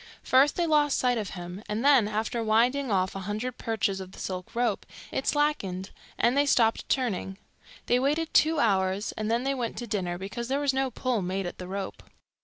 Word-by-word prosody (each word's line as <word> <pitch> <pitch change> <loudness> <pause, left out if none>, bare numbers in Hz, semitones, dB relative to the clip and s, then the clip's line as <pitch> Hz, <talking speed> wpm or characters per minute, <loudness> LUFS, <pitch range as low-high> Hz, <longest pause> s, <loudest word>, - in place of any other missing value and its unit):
First 270 +3 +4
they 345 - +1
lost 295 -3 +3
sight 245 -2 +2
of 205 -3 -4
him, 175 +2 -7
and 215 +5 -2
then, 270 -7 +6
after 220 +2 -2
winding 245 +5 +2
off 185 -2 +1
a - - -3
hundred 235 +4 -3
perches 215 -4 -1
of 190 0 -9
the - - -13
silk 185 +4 -5
rope, 235 -4 0 0.3
it 265 - -3
slackened, 205 -11 0 0.3
and 240 +2 +3
they 285 +1 +3
stopped 225 -4 +2
turning. 200 -7 -1 0.5
They 245 - +3
waited 300 +5 0
two 320 +1 +4
hours, 195 -3 +1
and 215 0 -4
then 235 +2 +1
they 275 +1 0
went 245 -4 -3
to 240 - -4
dinner, 185 -6 -2
because 205 +6 -5
there 270 +2 0
was 285 -2 +1
no 265 0 0
pull 245 -2 -1
made 190 +1 -2
at 175 - -6
the 180 - -6
rope. 195 0 -5
230 Hz, 205 wpm, -27 LUFS, 195-265 Hz, 0.5 s, then